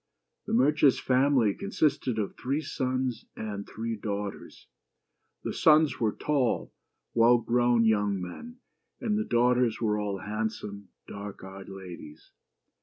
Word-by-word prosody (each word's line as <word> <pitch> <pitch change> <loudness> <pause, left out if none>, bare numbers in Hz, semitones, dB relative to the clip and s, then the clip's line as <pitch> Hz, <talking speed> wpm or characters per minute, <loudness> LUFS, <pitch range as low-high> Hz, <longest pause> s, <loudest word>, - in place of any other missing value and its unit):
The - - -2
merchant's 140 +3 +4
family 130 -4 +3
consisted 145 - 0
of 105 -3 -2
three 135 +4 -1
sons 130 -4 -2
and 105 -2 -5
three 115 +1 -4
daughters. 100 -1 -5 0.8
The - - -3
sons 155 -1 +4
were 110 -3 +2
tall, 135 -3 -1 0.4
well 120 +1 +6
grown, 120 0 +2
young 105 -3 +2
men, 165 - -8 0.4
and 220 -4 0
the 215 - +1
daughters 125 - +2
were 105 -2 +1
all 100 -1 -2
handsome, 105 0 -4 0.2
dark 100 -1 -8
eyed 95 +1 -9
ladies. 90 -5 -10
115 Hz, 125 wpm, -28 LUFS, 100-130 Hz, 0.8 s, well